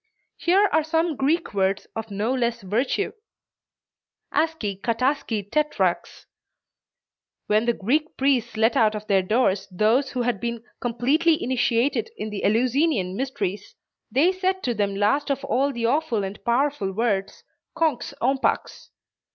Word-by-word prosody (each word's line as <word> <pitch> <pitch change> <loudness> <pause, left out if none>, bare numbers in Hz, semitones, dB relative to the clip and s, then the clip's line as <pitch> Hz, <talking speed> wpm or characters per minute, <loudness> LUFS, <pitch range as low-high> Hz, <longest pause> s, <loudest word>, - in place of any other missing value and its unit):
Here 385 +4 +3
are 315 - +3
some 325 +1 0
Greek 295 +4 0
words 195 0 0
of 225 0 -5
no 210 +5 -1
less 235 -2 -1
virtue: 240 - 0 1.2
"Aski, 220 -12 -1
Kataski, 230 -3 -1
Tetrax." 300 +6 -1 1.2
When 215 +2 +2
the 235 - +3
Greek 295 +10 -1
priests 250 -5 +1
let 225 +1 +3
out 215 -1 +3
of 210 0 -6
their 195 -2 +3
doors 205 0 +1
those 220 +8 +2
who 250 -2 -2
had 240 -4 -1
been 235 +1 -4 0.2
completely 275 +8 +1
initiated 255 - +1
in 215 - -5
the 205 - -5
Eleusinian 235 - +1
mysteries, 205 -6 -4 0.4
they 300 +8 +4
said 375 0 -1
to 245 - 0
them 200 -2 -1
last 210 +10 +1
of 275 0 -1
all 275 +1 +1
the 235 -3 -3
awful 255 -4 +1
and 195 +2 -6
powerful 240 -4 0
words, 200 -2 -1 0.3
"Konx, 310 -7 0
ompax." 265 +2 0
240 Hz, 140 wpm, -24 LUFS, 210-285 Hz, 1.2 s, they